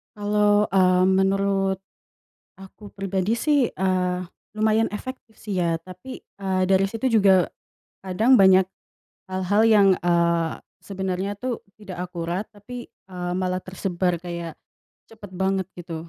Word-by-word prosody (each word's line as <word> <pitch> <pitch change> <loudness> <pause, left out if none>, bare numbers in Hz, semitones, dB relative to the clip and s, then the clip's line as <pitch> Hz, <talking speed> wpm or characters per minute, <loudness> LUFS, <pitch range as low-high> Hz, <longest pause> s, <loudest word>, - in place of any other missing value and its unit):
Kalau, 205 0 +2
eee, 185 -1 +4
menurut 195 0 +1 0.8
aku 195 +2 -14
pribadi 195 +2 -1
sih, 285 0 +2
eee, 185 -1 0 0.3
lumayan 220 +1 +2
efektif 255 -1 -8
sih 200 -3 -5
ya 170 -2 +1
tapi, 185 +8 -10 0.2
eee, 190 -1 -1
dari 195 0 +4
situ 225 +5 -2
juga 190 -3 +4 0.5
kadang 220 +8 +3
banyak 190 -2 +6 0.6
hal-hal 190 +3 +1
yang, 205 -3 +6
eee, 170 -1 +1 0.2
sebenarnya 190 0 -3
tuh 245 +2 -4 0.2
tidak 185 -4 -7
akurat 175 +3 -4
tapi, 240 +4 -10
eee, 180 -1 -7
malah 185 0 -1
tersebar 185 -1 -2
kayak 170 -1 -6 0.6
cepat 210 -3 -11
banget 190 0 0
gitu. 165 -1 -7
190 Hz, 125 wpm, -24 LUFS, 180-205 Hz, 0.8 s, banyak